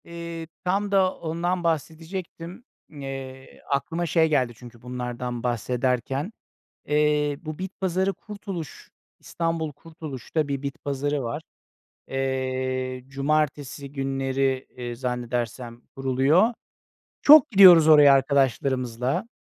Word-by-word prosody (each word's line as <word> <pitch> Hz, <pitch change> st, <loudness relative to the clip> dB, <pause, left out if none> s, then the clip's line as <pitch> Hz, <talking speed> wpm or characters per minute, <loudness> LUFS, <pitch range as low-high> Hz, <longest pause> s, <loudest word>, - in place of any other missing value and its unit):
Eee, 170 Hz, -1 st, -7 dB, 0.2 s
tam 195 Hz, +2 st, 0 dB
da 190 Hz, -2 st, +3 dB
ondan 175 Hz, +2 st, -2 dB
bahsedecektim. 165 Hz, -, -4 dB, 0.3 s
Eee, 135 Hz, -2 st, -8 dB
aklıma 165 Hz, +5 st, -1 dB
şey 160 Hz, 0 st, +3 dB
geldi 130 Hz, -5 st, +1 dB
çünkü 120 Hz, 0 st, -14 dB
bunlardan 125 Hz, -1 st, -5 dB
bahsederken. 125 Hz, -, -1 dB, 0.6 s
Eee, 150 Hz, -1 st, +2 dB
bu 155 Hz, -3 st, -6 dB
bit 190 Hz, 0 st, -4 dB
pazarı 190 Hz, +1 st, 0 dB
Kurtuluş, 195 Hz, -7 st, -8 dB, 0.3 s
İstanbul 165 Hz, -2 st, -2 dB
Kurtuluş'ta 155 Hz, -1 st, -5 dB
bir 140 Hz, -1 st, -3 dB
bit 140 Hz, -1 st, -6 dB
pazarı 140 Hz, 0 st, -1 dB
var. 135 Hz, +6 st, -4 dB, 0.7 s
Eee, 130 Hz, -1 st, -2 dB
cumartesi 140 Hz, 0 st, -1 dB
günleri, 135 Hz, -1 st, -1 dB
eee, 120 Hz, -1 st, -5 dB
zannedersem 120 Hz, -1 st, -4 dB
kuruluyor. 135 Hz, -, +3 dB, 0.7 s
Çok 300 Hz, -2 st, +8 dB
gidiyoruz 180 Hz, -6 st, +9 dB
oraya 150 Hz, -3 st, +8 dB
arkadaşlarımızla. 130 Hz, -, 0 dB
140 Hz, 100 wpm, -25 LUFS, 130-165 Hz, 0.7 s, gidiyoruz